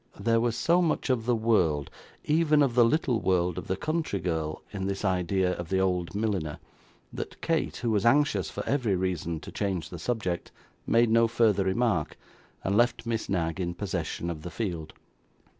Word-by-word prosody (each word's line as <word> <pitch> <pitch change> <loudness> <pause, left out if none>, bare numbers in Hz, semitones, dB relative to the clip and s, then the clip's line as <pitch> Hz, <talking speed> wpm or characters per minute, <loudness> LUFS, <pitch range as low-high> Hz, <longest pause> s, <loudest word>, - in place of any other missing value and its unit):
There 115 0 +2
was 120 -1 0
so 175 +2 +3
much 160 -5 +1
of 115 -2 -1
the 120 - +3
world 90 -11 +1 0.3
even 150 -1 +4
of 135 -4 +1
the 120 0 +6
little 125 -1 +2
world 90 -2 +1
of - - -9
the 95 - 0
country 155 -6 -1
girl 80 -3 -3
in 95 -1 -3
this 100 +1 -3
idea 90 0 +1
of 85 -2 -6
the 95 - +1
old 90 -1 0
milliner, 100 -8 -1 0.6
that - - -6
Kate, - - 0
who 120 -2 -1
was 105 -3 +1
anxious, 145 +5 +3
for - - -5
every 120 -8 +1
reason, 90 -3 -2
to - - -9
change 95 -8 -2
the - - -8
subject, 100 -8 -2 0.4
made 115 0 +4
no 115 0 +5
further 110 -4 +2
remark, 95 -4 0 0.5
and 95 - 0
left 120 +1 +2
Miss 115 -1 -2
Knag 85 -2 -1
in 85 -1 -2
possession 85 -3 -3
of 80 -2 -7
the 90 - -6
field. 85 -7 -4
100 Hz, 185 wpm, -28 LUFS, 90-115 Hz, 0.6 s, the